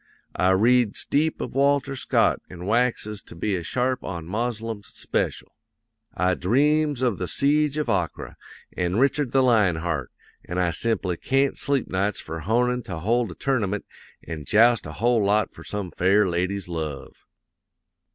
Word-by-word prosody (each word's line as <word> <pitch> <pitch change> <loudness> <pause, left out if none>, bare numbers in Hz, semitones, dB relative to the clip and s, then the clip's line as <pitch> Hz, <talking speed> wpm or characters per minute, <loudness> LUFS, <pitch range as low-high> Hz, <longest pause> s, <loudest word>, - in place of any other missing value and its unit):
I 90 - +2
reads 115 +3 +3
deep 155 +2 +1
of - - -5
Walter 140 0 +2
Scott 130 - +1
an' 90 -1 -9
waxes 110 -2 0
to - - -13
be 100 +4 -1
a 90 - -2
sharp 125 +8 -1
on 85 -4 -5
Moslems 110 +1 -3
speshul. - - -3 0.6
I 90 0 +2
dreams 145 +8 +2
of 120 -7 +1
the 90 - -2
Siege 150 - +1
of 150 - -1
Acre, - - -2 0.4
an' 90 0 -1
Richard 135 0 +2
the 135 -1 +3
Lion 110 -8 +4
Heart; 80 -6 -3 0.3
an' 90 - -5
I 90 -1 +2
simply 95 -1 -1
can't 135 +5 +1
sleep 140 -3 -1
nights 100 +3 -1
for 80 +1 -6
honin' 125 +8 +1
to 90 - -5
hold 115 +6 +1
a 85 - -9
tournament 105 -7 -1 0.4
an' 80 -3 -6
joust 115 -2 +4
a 75 - -7
whole 115 +6 +2
lot 105 +2 +1
for - - -12
some 100 -4 -4
fair 95 +5 +3
lady's 90 +2 -2
love. 80 -5 -6
105 Hz, 160 wpm, -24 LUFS, 90-125 Hz, 0.6 s, Lion